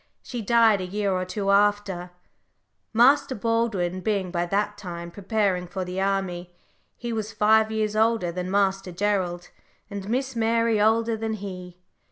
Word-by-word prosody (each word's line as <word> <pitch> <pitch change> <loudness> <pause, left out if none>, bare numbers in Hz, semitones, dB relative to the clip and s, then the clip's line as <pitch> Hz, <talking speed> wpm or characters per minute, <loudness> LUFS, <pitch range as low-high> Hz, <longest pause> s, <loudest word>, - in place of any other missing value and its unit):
She 245 -2 -5
died 225 -2 +4
a - - -3
year 200 +1 -1
or 185 0 -1
two 195 +2 -1
after, 200 -3 +2 0.8
Master 265 +4 +4
Baldwin 210 -5 0
being 195 -3 -1
by 175 0 -1
that 205 +2 0
time 170 -4 -7
preparing 195 -2 -1
for 185 +1 -4
the 180 +1 -3
army, 190 -3 -1
for 175 - -36 0.4
he 240 -1 -4
was 220 -1 -3
five 220 +1 +3
years 215 -1 -1
older 220 -5 +2
than 180 +1 -4
Master 195 -1 +1
Gerald, 180 -2 -1 0.4
and 200 0 -6
Miss 260 +2 -1
Mary 230 -1 +2
older 225 +1 +3
than 220 0 -3
he. 180 -4 -7
205 Hz, 160 wpm, -25 LUFS, 185-220 Hz, 0.8 s, died